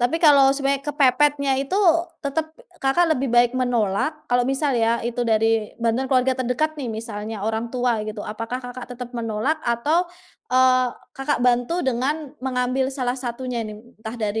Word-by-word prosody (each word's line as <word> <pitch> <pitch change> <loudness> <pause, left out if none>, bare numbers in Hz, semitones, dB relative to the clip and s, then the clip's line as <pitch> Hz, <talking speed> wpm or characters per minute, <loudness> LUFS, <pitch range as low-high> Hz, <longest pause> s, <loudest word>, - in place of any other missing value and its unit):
tapi 245 +6 +2
kalau 280 -4 +6
sebenarnya 275 0 0
kepepetnya 280 0 +3
itu 280 +8 -2 0.4
tetap 300 +3 -2 0.4
Kakak 270 +6 +3
lebih 265 +1 -1
baik 240 0 +5
menolak 240 -1 +1 0.2
kalau 245 0 +2
misal 270 +1 0
ya 230 0 +2
itu 240 +1 -2
dari 225 -1 +1
bantuan 230 +3 +1
keluarga 260 0 +2
terdekat 260 +5 -1
nih 255 -6 -4
misalnya 220 -1 -5
orang 225 +1 -2
tua 245 -4 0
gitu 215 0 -6
apakah 230 +4 -5
Kakak 245 0 -7
tetep 245 0 -7
menolak 230 +6 -1
atau, 285 +9 +1 0.5
eee, 255 0 +5 0.3
Kakak 270 +2 -1
bantu 245 +7 +2
dengan 275 +3 -1 0.2
mengambil 260 +1 0
salah 255 -2 -1
satunya 245 -1 -4
nih 215 -1 -7 0.2
entah 220 +2 -7
dari 215 0 -1
250 Hz, 160 wpm, -22 LUFS, 230-270 Hz, 0.5 s, kalau